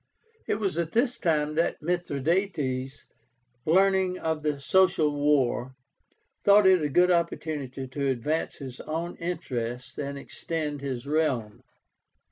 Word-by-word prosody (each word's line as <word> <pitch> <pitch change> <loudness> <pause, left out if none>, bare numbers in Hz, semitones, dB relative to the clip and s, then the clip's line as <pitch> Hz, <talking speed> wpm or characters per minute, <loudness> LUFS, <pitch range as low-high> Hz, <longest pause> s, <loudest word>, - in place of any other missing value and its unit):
It - - +1
was 195 -5 -1
at 165 -1 -2
this 245 +2 +2
time 150 -3 +1
that 165 +2 0
Mithradátes, 150 -4 -1 0.6
learning 190 +1 +3
of 160 -2 -2
the 150 -2 -1
Social 155 -1 +3
War, 135 -3 +1 0.7
thought 205 0 +6
it 185 -2 +6
a 150 - 0
good 180 +5 +4
opportunity 150 -6 -2
to 140 +2 -2
advance 135 +5 -1
his 130 -3 -9
own 165 +3 -4
interests 125 -9 -4
and 140 0 -4
extend 150 0 -4
his 130 -3 -4
realm. 140 -8 -1
155 Hz, 125 wpm, -27 LUFS, 135-175 Hz, 0.7 s, thought